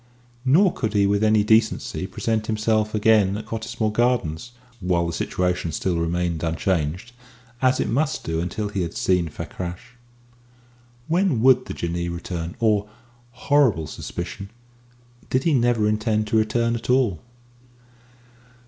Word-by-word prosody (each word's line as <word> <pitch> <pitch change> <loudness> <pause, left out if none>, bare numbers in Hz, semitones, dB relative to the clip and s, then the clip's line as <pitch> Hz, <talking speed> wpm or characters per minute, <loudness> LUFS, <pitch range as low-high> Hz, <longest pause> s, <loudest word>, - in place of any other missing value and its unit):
Nor 175 +9 +4
could 110 -3 -3
he 100 -1 +3
with 100 +1 +1
any 110 -1 +4
decency 110 +1 +1
present 110 -1 -2
himself 110 0 0
again 105 -2 +3
at 110 - -7
Cottesmore 110 0 -3
Gardens 120 -5 0 0.3
while 90 -3 +1
the 85 - -3
situation 90 -1 -1
still 85 +2 -1
remained 85 0 -1
unchanged, 85 +4 -1 0.5
as 130 0 +3
it - - 0
must 150 +6 0
do 80 0 -2
until 105 +4 -3
he 100 -2 -2
had 85 -2 -4
seen 90 -3 +1
Fakrash. 90 - -7 1.1
When 175 - +2
would 130 -1 +5
the - - -5
Jinnee 85 0 -3
return, 85 -1 -5
or 105 -2 +1 0.4
horrible 120 - +2
suspicion! 100 +5 -6 0.8
did 130 +1 +1
he 165 - +2
never 120 -4 +2
intend 110 0 0
to - - 0
return 115 +2 +1
at 115 - -7
all? 125 -8 +2
105 Hz, 140 wpm, -23 LUFS, 90-115 Hz, 1.1 s, would